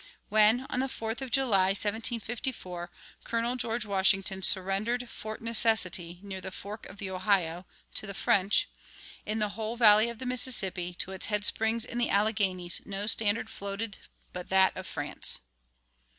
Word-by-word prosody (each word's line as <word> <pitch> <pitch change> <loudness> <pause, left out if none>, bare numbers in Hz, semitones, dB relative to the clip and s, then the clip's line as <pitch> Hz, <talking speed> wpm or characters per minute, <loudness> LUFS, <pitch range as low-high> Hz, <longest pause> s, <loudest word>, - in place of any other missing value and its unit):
When, 215 +4 +4
on 250 - -1
the 265 - 0
4th 225 -1 -4
of 265 - -5
July, 230 -8 +3
1754, 220 -4 -3 0.3
Colonel 235 +1 -1
George 235 -2 -1
Washington 195 -1 +2
surrendered 200 +7 +1
Fort 215 -1 -8
Necessity, 190 -7 +2
near 190 -2 -6
the - - -5
fork 205 +3 -9
of 190 - -13
the 195 -2 -5
Ohio, 185 -2 0 0.3
to 215 - -2
the 200 - -6
French, 195 0 +2 0.6
"in 215 +1 -1
the 210 -1 +1
whole 220 +2 -4
valley 215 0 +6
of 235 - -7
the 260 - -7
Mississippi, 195 -8 +2
to 190 - -3
its 190 - -3
headsprings 220 +2 +1
in 240 - -5
the 240 - +1
Alleghanies, 200 -4 +1
no 200 0 -5
standard 215 0 +1
floated 200 +1 -5 0.3
but 180 -1 -7
that 190 0 +4
of 185 - -7
France." 145 -1 -3
210 Hz, 155 wpm, -28 LUFS, 190-230 Hz, 0.6 s, valley